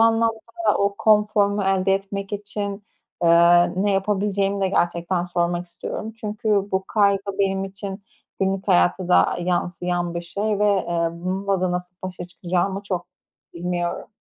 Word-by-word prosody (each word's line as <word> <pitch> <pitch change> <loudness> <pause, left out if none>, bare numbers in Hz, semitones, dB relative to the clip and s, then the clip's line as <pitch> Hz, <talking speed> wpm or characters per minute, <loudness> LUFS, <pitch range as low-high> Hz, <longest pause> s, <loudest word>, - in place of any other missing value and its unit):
anlamda 225 +8 +2
o 200 0 +1
konforumu 210 -1 +3
elde 195 0 +2
etmek 195 +1 -4
için, 205 0 -4 0.4
ııı, 170 +1 +6
ne 205 - +2
yapabileceğimi 200 0 0
de 190 - +2
gerçekten 175 0 0
sormak 175 0 -1
istiyorum. 215 +5 -6
Çünkü 215 +1 -4 0.2
bu 190 0 0
kaygı 200 -2 +2 0.2
benim 195 -1 +1
için 195 +1 -7 0.4
günlük 195 0 -1
hayata 90 - +3
da, - - +5
ııı, 175 - -4
yansıyan 175 0 -1
bir 170 - -2
şey 205 +4 -2
ve, 210 - +2 0.2
eee, 170 -1 +1
bununla 190 +2 -2
da 185 -1 0
nasıl 180 0 -5
başa 180 -1 -5
çıkacağımı 180 +2 -2
çok 180 -3 -3 0.5
bilmiyorum. 175 0 -3
195 Hz, 145 wpm, -23 LUFS, 175-200 Hz, 0.5 s, ııı